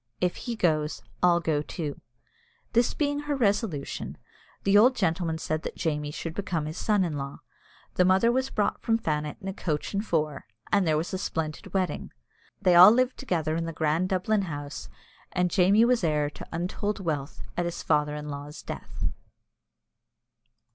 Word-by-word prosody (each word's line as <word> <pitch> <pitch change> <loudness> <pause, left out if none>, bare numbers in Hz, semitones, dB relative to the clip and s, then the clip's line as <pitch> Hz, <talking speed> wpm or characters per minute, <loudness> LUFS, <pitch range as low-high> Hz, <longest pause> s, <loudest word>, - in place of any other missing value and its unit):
If 180 -1 +1
he 240 -2 -4
goes, 155 -6 0 0.2
I'll 175 -1 +5
go 155 -3 0
too." 150 -1 -5 0.7
This 235 +1 +3
being 290 -1 0
her 290 0 -2
resolution, 200 - -1 0.5
the 195 +1 +3
old 245 +5 +7
gentleman 165 -5 0
said 155 -1 -2
that - - -6
Jamie 150 -2 -1
should 160 +2 -5
become 175 -5 -2
his 155 +3 -5
son 210 -3 +2
in 160 -5 -2
law. 140 0 -6 0.5
The 180 - +3
mother 190 +6 +4
was 260 +2 0
brought 210 -5 0
from 225 -1 +2
Fannet 150 -7 -2
in 195 - -8
a 195 - -2
coach 155 -4 -3
and 200 +1 0
four, 155 -7 -1 0.2
and 200 -3 +3
there 155 -1 +3
was 165 +4 -3
a 190 - -1
splendid 155 -4 -3
wedding. 185 -2 -1 0.5
They 185 -3 +4
all 180 +3 +11
lived 255 +3 +2
together 160 - -1
in 165 0 -1
the 165 - -4
grand 160 +4 +1
Dublin 200 +3 +1
house, 145 -3 -6 0.4
and 180 -1 +1
Jamie 200 +5 +5
was 245 -4 +2
heir 150 -2 +1
to - - -10
untold 185 +5 -2
wealth 155 -5 -3
at 175 - 0
his 170 - -4
father 150 -1 +2
in 150 0 -6
law's 145 +1 -7
death. - - -6
175 Hz, 175 wpm, -27 LUFS, 155-205 Hz, 0.7 s, all